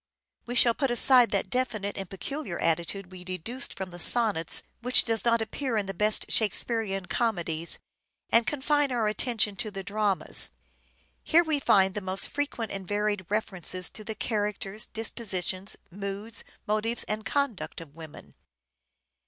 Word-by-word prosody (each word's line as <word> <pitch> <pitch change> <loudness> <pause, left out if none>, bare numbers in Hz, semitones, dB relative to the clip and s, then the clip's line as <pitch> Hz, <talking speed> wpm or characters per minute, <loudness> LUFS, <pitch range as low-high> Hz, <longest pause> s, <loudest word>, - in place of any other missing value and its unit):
We 245 - -4
shall 235 -1 +7
put 270 +2 -1
aside 245 0 +6
that 195 -1 -2
definite 215 -6 -2
and 195 -2 -6
peculiar 195 - -5
attitude 170 +3 -2
we 185 -1 -10
deduced 185 - -3
from 190 -1 -6
the 175 - -10
Sonnets, 210 -7 +5 0.2
which 250 +1 +5
does 225 -2 +1
not 230 -1 +2
appear 235 +2 -3
in 205 - -1
the 195 - -5
best 210 +4 +2
Shakespearean 215 -3 +1
comedies, 175 -8 0 0.5
and 230 0 +4
confine 290 -1 +1
our 235 -3 0
attention 215 -1 0
to 220 0 -4
the 195 -1 -7
dramas. 205 -1 +1 0.7
Here 340 +1 +4
we 310 -3 -1
find 190 -7 +3
the 210 - -4
most 185 0 +2
frequent 280 -6 -3
and 195 -2 -6
varied 205 -2 -1
references 185 -4 +1
to 215 - -8
the 220 +1 -6
characters, 210 -1 -2
disposition, 195 -4 -3 0.2
moods, 200 +3 -4 0.2
motives 215 +2 -1
and 215 0 -4
conduct 255 -3 -2
of 160 -4 -12
women. 160 -1 -12
210 Hz, 155 wpm, -27 LUFS, 190-235 Hz, 0.7 s, shall